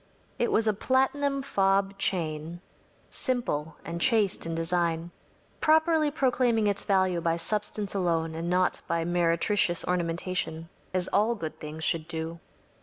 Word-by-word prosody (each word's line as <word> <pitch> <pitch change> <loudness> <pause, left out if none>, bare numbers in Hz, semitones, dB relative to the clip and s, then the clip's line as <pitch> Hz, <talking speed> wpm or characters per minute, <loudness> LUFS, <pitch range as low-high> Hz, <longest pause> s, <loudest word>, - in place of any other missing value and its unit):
It 240 - +1
was 220 0 +3
a 215 - +3
platinum 270 +5 +1
fob 195 -4 +1
chain 165 -2 -2 0.5
simple 160 - -2
and 170 +1 -5
chaste 220 -9 +2
in 165 - -3
design, 170 0 -1 0.5
properly 315 0 +3
proclaiming 250 -6 +1
its 200 -1 0
value 190 -3 +2
by 165 0 0
substance 210 +2 -2
alone 165 -4 0
and 165 +2 -4
not 180 0 +1
by 165 0 -1
meretricious 175 +1 +2
ornamentation‚ÄĒas 175 0 -2
all 225 +3 +3
good 160 -6 -6
things 155 +1 -6
should 165 -2 +1
do. 165 0 -4
180 Hz, 130 wpm, -27 LUFS, 165-215 Hz, 0.5 s, was